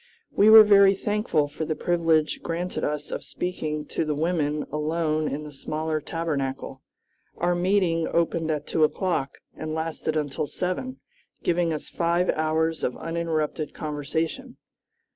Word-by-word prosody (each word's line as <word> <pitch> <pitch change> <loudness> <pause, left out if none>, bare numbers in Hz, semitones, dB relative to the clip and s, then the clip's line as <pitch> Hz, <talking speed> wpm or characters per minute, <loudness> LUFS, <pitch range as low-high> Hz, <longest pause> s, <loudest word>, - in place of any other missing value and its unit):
We 210 - +5
were 220 0 +11
very 200 -1 +6
thankful 205 -7 0
for 145 - -5
the 155 0 -2
privilege 165 -3 +1
granted 175 +2 -3
us 150 0 -2
of - - -4
speaking 155 -4 -4
to - - -1
the 155 -1 -1
women 150 -2 0
alone 155 +1 0
in 150 +1 -3
the 150 - -8
smaller 155 +2 -3
Tabernacle. 140 -5 -3 0.6
Our 175 +1 +1
meeting 175 -2 +1
opened 165 -1 0
at 150 -1 -1
two 160 - +1
o'clock 155 -3 0 0.2
and 155 0 -4
lasted 160 -1 -2
until 145 0 -2
seven, 185 - -3 0.4
giving 170 -1 +1
us 155 - -4
five 170 +1 +1
hours 160 +1 0
of 125 - -1
uninterrupted 160 -2 -2
conversation. 160 - -3
160 Hz, 145 wpm, -25 LUFS, 150-175 Hz, 0.6 s, were